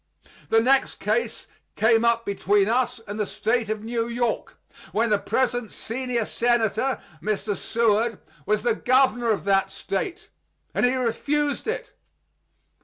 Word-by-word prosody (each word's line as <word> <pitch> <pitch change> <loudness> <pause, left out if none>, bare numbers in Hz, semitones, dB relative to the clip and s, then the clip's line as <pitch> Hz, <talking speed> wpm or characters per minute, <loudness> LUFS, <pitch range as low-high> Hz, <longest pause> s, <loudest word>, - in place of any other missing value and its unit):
The 225 - +5
next 265 +3 +3
case 475 - -1 0.3
came 225 +1 +4
up 230 0 +2
between 200 0 +2
us 245 +1 +1
and 205 +2 -5
the 210 - +1
State 225 -1 0
of 215 -1 -3
New 230 0 -1
York, 235 0 -2 0.4
when 225 +1 +1
the 210 - +3
present 245 -2 0
senior 240 -1 -3
senator 240 +2 +1 0.2
[Mr. 210 0 -1
Seward] 225 +1 +1 0.3
was 210 0 +1
the 240 -1 +3
governor 245 0 +2
of 215 - +1
that 195 -1 +2
State; 350 - -4 0.4
and - - +3
he 255 - +1
refused 285 - -1
it. 455 +3 -3
230 Hz, 140 wpm, -24 LUFS, 215-250 Hz, 0.4 s, The